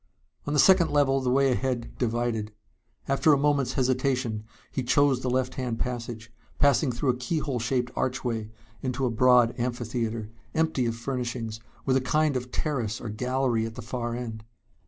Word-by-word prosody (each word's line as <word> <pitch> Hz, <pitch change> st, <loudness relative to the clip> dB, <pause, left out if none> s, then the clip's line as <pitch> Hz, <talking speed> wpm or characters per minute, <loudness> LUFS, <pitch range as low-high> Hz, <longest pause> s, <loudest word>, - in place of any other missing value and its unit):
On 145 Hz, -, -1 dB
the 150 Hz, -, +2 dB
second 185 Hz, +2 st, +6 dB
level 135 Hz, -2 st, +3 dB
the 130 Hz, -, 0 dB
way 135 Hz, +1 st, +4 dB
ahead 125 Hz, -1 st, -2 dB
divided. 115 Hz, -3 st, -1 dB, 0.6 s
After 135 Hz, +3 st, +4 dB
a -, -, +4 dB
moment's 140 Hz, -3 st, +1 dB
hesitation 125 Hz, -4 st, 0 dB, 0.3 s
he 135 Hz, -, -2 dB
chose 130 Hz, +1 st, +3 dB
the 130 Hz, -, -1 dB
left 130 Hz, 0 st, 0 dB
hand 120 Hz, -3 st, -2 dB
passage, 115 Hz, -1 st, -5 dB, 0.2 s
passing 145 Hz, -1 st, +3 dB
through 125 Hz, +3 st, -1 dB
a -, -, -4 dB
keyhole 140 Hz, -1 st, -2 dB
shaped 125 Hz, +1 st, -1 dB
archway 120 Hz, -4 st, -2 dB, 0.3 s
into 130 Hz, 0 st, -1 dB
a 125 Hz, -, +1 dB
broad 125 Hz, 0 st, +5 dB
amphitheater, 115 Hz, -2 st, -2 dB, 0.2 s
empty 160 Hz, -6 st, +1 dB
of 115 Hz, -, -1 dB
furnishings, 120 Hz, -2 st, -4 dB, 0.3 s
with 130 Hz, -1 st, +3 dB
a -, -, +1 dB
kind 150 Hz, +3 st, +1 dB
of 125 Hz, 0 st, -3 dB
terrace 120 Hz, -8 st, -2 dB
or 115 Hz, -, -6 dB
gallery 125 Hz, +1 st, 0 dB
at 110 Hz, -, -9 dB
the 125 Hz, -, -7 dB
far 120 Hz, 0 st, -3 dB
end. 115 Hz, -3 st, -5 dB
125 Hz, 170 wpm, -27 LUFS, 115-135 Hz, 0.6 s, second